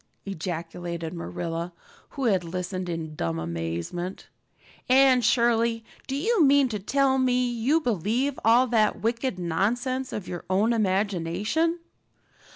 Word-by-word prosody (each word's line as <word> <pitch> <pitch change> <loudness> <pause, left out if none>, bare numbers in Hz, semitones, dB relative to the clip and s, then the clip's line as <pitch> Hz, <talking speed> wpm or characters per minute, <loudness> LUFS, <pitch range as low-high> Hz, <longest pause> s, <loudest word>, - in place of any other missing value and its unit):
ejaculated 170 -2 -5
Marilla, 170 0 -4 0.5
who 270 - -1
had 195 -6 +2
listened 180 +1 -4
in 165 -2 -4
dumb 85 - -2
amazement. 85 - -4 0.6
"Anne 260 -1 +6
Shirley, 230 0 +2 0.2
do 270 - -2
you 395 +5 +2
mean 280 -1 +5
to 215 -3 -3
tell 265 +6 +2
me 250 -1 +2
you 240 +6 +1
believe 245 - -1
all 235 +3 +5
that 220 -4 +2
wicked 235 -1 -1
nonsense 240 +10 -1
of 205 -4 -5
your 175 - -6
own 205 +5 +2
imagination?" 205 - 0
215 Hz, 125 wpm, -26 LUFS, 175-255 Hz, 0.6 s, Anne